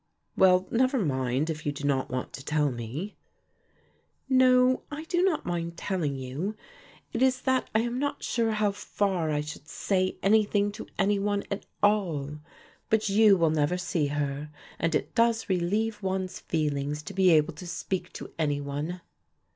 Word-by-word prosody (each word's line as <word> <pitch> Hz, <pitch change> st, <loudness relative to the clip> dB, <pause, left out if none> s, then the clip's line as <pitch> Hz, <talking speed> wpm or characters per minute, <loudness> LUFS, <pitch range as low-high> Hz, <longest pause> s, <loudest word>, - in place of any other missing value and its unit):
"Well, 185 Hz, 0 st, +5 dB
never 260 Hz, +3 st, +2 dB
mind 135 Hz, -, 0 dB
if 155 Hz, -1 st, -6 dB
you 145 Hz, -, 0 dB
do 145 Hz, 0 st, -8 dB
not 140 Hz, -2 st, +1 dB
want 130 Hz, 0 st, -4 dB
to 135 Hz, -, -8 dB
tell 150 Hz, -1 st, +1 dB
me." 125 Hz, -, -6 dB, 1.1 s
"No, 255 Hz, -1 st, +5 dB
I 295 Hz, +1 st, -6 dB
do 350 Hz, +2 st, 0 dB
not 370 Hz, -4 st, +1 dB
mind 170 Hz, -1 st, -3 dB
telling 170 Hz, -9 st, -1 dB
you; 135 Hz, +11 st, -4 dB, 0.6 s
it -, -, -2 dB
is 260 Hz, -1 st, +3 dB
that 260 Hz, -1 st, +1 dB
I 220 Hz, -, +5 dB
am 240 Hz, +2 st, -2 dB
not 285 Hz, +1 st, -2 dB
sure 230 Hz, -2 st, 0 dB
how 210 Hz, -1 st, +2 dB
far 195 Hz, -4 st, -1 dB
I 150 Hz, -1 st, 0 dB
should 150 Hz, 0 st, -8 dB
say 185 Hz, +2 st, 0 dB
anything 205 Hz, 0 st, +3 dB
to 215 Hz, -, -9 dB
any 200 Hz, +1 st, +2 dB
one 205 Hz, 0 st, 0 dB
at 200 Hz, -, -4 dB, 0.2 s
all. 165 Hz, -9 st, +1 dB, 0.5 s
But 220 Hz, -1 st, +2 dB
you 205 Hz, 0 st, +6 dB
will 165 Hz, -2 st, +3 dB
never 155 Hz, +3 st, +1 dB
see 175 Hz, -4 st, 0 dB
her 145 Hz, 0 st, -2 dB, 0.3 s
and 165 Hz, -1 st, +1 dB
it -, -, -1 dB
does 230 Hz, -1 st, +2 dB
relieve 205 Hz, +4 st, 0 dB
one's 190 Hz, -1 st, -2 dB
feelings 150 Hz, -2 st, -2 dB
to 200 Hz, -, -7 dB
be 190 Hz, -1 st, +4 dB
able 160 Hz, 0 st, +4 dB
to 175 Hz, +4 st, -9 dB
speak 180 Hz, +1 st, -3 dB
to -, -, -8 dB
any 145 Hz, -2 st, +1 dB
one." 145 Hz, +5 st, -4 dB
180 Hz, 170 wpm, -28 LUFS, 150-210 Hz, 1.1 s, you